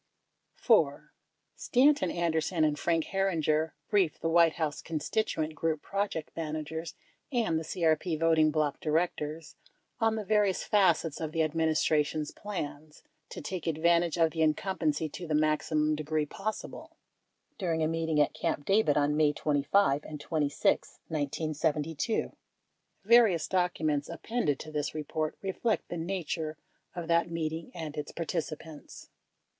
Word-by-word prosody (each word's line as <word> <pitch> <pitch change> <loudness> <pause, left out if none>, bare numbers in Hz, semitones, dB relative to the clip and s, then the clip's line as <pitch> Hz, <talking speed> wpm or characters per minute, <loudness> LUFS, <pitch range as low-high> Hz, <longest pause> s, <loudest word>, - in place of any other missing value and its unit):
60 - - -24
4. - - +3 0.4
Stanton 285 +4 +3
Anderson 165 0 0
and 150 -1 +1
Frank 165 -2 +1
Herringer 160 -5 +1
briefed 195 -7 +2
the 165 - -1
White 165 -1 +5
House 155 -3 -2
constituent 160 0 -2
group 155 -1 -2
project 195 -6 -2
managers 160 0 -4 0.4
and 225 - +1
the - - -5
CRP 160 0 0
voting 160 -1 +4
bloc 150 -2 0
directors 155 -1 -2 0.4
on 225 -1 +2
the 215 -2 -4
various 210 -2 +2
facets 185 -6 +2
of 155 -1 -3
the 165 - +2
administration's 155 -1 +1
plans 155 -6 -7 0.3
"to - - -7
take 180 -4 -5
advantage 170 +1 +2
of 165 -1 +3
the 160 - -2
incumbency 160 -1 +1
to 170 +3 -8
the 155 - 0
maximum 155 0 +2
degree 155 0 -1
possible" 205 +8 -6 0.6
during 165 -4 0
a - - +2
meeting 160 -1 0
at 145 - +3
Camp 145 - -2
David 195 -8 +3
on 145 0 +2
May 150 -1 +4
25 145 +1 +2
and 150 -1 -8
26, 145 -2 0
1972. 155 +4 -1 0.7
Various 215 -8 +5
documents 160 -6 0
appended 170 - -1
to 155 - -9
this 150 0 -2
report 155 0 -3
reflect 205 +4 -1
the 175 - -4
nature 165 -3 -3 0.4
of 175 -2 -5
that 170 0 +2
meeting 165 -1 -3
and 160 -3 -5
its 150 -1 -5
participants. 160 -2 -6
160 Hz, 135 wpm, -30 LUFS, 155-175 Hz, 0.7 s, White